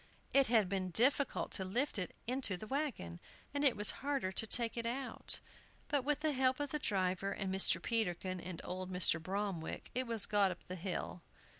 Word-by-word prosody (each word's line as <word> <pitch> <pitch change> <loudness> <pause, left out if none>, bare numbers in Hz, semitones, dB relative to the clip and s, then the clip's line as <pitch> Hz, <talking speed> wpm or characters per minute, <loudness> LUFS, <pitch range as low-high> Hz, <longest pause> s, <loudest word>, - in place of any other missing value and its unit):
It 275 -1 +5
had 220 -4 +4
been 185 -1 -2
difficult 260 - +2
to 190 - 0
lift 235 +6 -1
it 180 - -4
into 250 -6 +1
the 215 - -8
wagon, 230 - -3 0.3
and 285 0 -1
it 275 -4 +5
was 210 -1 +7
harder 275 -9 -1
to 220 +4 -1
take 230 0 +1
it 230 -1 -2
out. 260 +3 -1 0.5
But 285 -3 +1
with 295 +2 0
the 310 -1 +2
help 260 -1 +1
of 290 -2 -3
the 300 - -2
driver, 190 -3 0
and 195 -2 -3
Mr. 190 - +4
Peterkin, 185 -4 -1
and 175 -1 -7
old 185 +1 -5
Mr. 180 -3 +4
Bromwick, 190 -2 -4
it 255 0 -1
was 230 -3 +3
got 205 -2 +3
up 180 - -7
the 180 - -8
hill. 180 -1 -4
210 Hz, 195 wpm, -35 LUFS, 185-260 Hz, 0.5 s, was